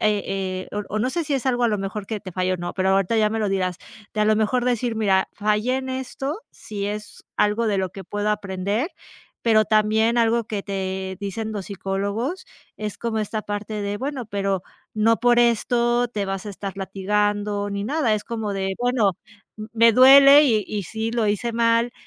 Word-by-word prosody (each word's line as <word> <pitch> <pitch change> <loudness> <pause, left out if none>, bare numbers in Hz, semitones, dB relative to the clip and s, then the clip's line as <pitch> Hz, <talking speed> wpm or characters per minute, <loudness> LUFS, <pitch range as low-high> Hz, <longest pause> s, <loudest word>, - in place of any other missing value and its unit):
eh 195 -3 -1
o 210 - -2
o - - +1
no 250 +4 0
sé 340 +3 -2
si 290 - -1
es 270 - -2
algo 245 -2 +1
a - - +4
lo 210 - +1
mejor 195 +1 -5
que 220 -2 -4
te 185 -2 -9
falla 185 +1 0
o - - -3
no, 175 0 -5
pero 190 0 0
ahorita 195 +3 +2
ya 215 -1 +4
me 225 - -2
lo 210 -2 0
dirás, 185 -2 -1 0.4
que 215 - -1
a - - +4
lo 215 0 +4
mejor 220 +3 +1
decir: 245 -2 0
"Mira, 195 -3 +2
fallé 215 +4 +1
en 265 0 -4
esto, 265 - -4
si 200 -2 -6
es 210 +1 -6
algo 210 +3 +2
de 210 -2 +1
lo 190 -1 -1
que 195 - -9
puedo 205 +3 -2
aprender", 200 - -2 0.5
pero 220 -2 +4
también 220 +2 +2
algo 230 0 +2
que 210 -2 -4
te 190 -1 -4
dicen 210 +2 -4
los 205 -3 -5
psicólogos, 200 - -3 0.3
es 210 -2 -4
como 230 -2 -2
esta 215 0 -2
parte 205 +1 -4
de: 200 0 -2
"Bueno, 270 0 -4
pero 195 -3 -1 0.3
no 220 +1 +3
por 240 0 +4
esto 240 +1 +2
te 210 -4 -3
vas 195 -1 -4
a - - -4
estar 195 0 -6
latigueando 205 +1 -1
ni 200 0 -3
nada", 275 -2 +1
es 210 - -4
como 220 -3 -3
de: 195 0 -1
"Bueno, 245 -4 +2 0.6
me 230 0 +6
duele 275 +4 +8
y 220 -7 +2
y 205 -2 -3
sí, 220 +5 -3
lo 230 -2 +1
hice 210 +3 -1
mal, 230 +1 +2
215 Hz, 205 wpm, -23 LUFS, 200-235 Hz, 0.6 s, duele